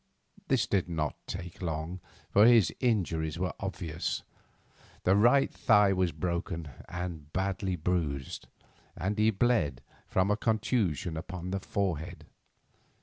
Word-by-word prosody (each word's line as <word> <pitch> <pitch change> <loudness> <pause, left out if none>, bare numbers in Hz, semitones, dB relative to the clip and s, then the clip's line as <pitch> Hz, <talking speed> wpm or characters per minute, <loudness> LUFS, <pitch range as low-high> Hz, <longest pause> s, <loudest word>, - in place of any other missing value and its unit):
This 130 -7 +2
did 95 -2 0
not 80 -3 -1
take 90 -1 -6
long, 80 +1 -3 0.3
for 105 +3 +7
his 115 -5 +6
injuries 85 - 0
were 90 0 -1
obvious. 90 -4 -3 0.8
The 95 - +4
right 120 +7 +4
thigh 105 -1 +4
was 90 -2 +1
broken 85 0 -3 0.2
and 85 -4 -5
badly 95 0 -1
bruised, 80 -5 -2 0.5
and 95 +5 -1
he 110 +1 +5
bled 95 - +1 0.2
from 95 +2 +2
a 105 - +2
contusion 110 - 0
upon 90 +2 -5
the 95 - -1
forehead. 95 -5 -3
90 Hz, 125 wpm, -30 LUFS, 80-100 Hz, 0.8 s, for